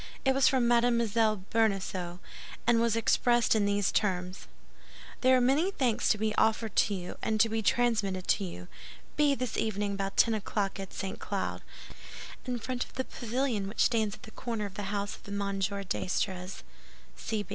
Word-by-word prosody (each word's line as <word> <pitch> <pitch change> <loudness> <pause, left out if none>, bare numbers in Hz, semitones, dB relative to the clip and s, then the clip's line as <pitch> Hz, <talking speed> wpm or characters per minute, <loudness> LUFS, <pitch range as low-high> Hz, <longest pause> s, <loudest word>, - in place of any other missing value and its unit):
It 265 - +4
was 270 0 +4
from 255 -3 +3
Mme. 240 0 +4 0.5
Bonacieux, 195 -5 0 0.5
and 230 -1 +4
was 230 -1 +2
expressed 240 +1 +3
in 215 -2 +2
these 200 -1 +1
terms: 185 -2 -1 0.7
"There 260 0 +5
are - - +3
many 275 +9 +3
thanks 255 - 0
to - - +3
be 215 0 0
offered 220 -1 +1
to 205 - +3
you, 180 -1 -6
and 220 -1 0
to 225 +1 +5
be 225 0 -1
transmitted 210 -5 +1
to 205 - +3
you. 90 - -7 0.5
Be 295 -2 +3
this 255 -3 -3
evening 205 -2 -1
about 195 0 -3
ten 230 - +5
o'clock 205 -1 -2
at 195 -1 -6
St. 195 -1 -5
Cloud, - - -3 0.9
in 250 -1 -1
front 250 +2 -3
of - - -15
the 260 - -3
pavilion 240 -3 -2
which 205 - -3
stands 220 -3 +2
at - - -21
the 220 - -11
corner 230 -4 -4
of 200 - -7
the 195 0 -5
house 205 0 -2
of - - -17
M. 200 -1 -2
d'Estrées. 190 -1 -2
215 Hz, 175 wpm, -30 LUFS, 195-240 Hz, 0.9 s, There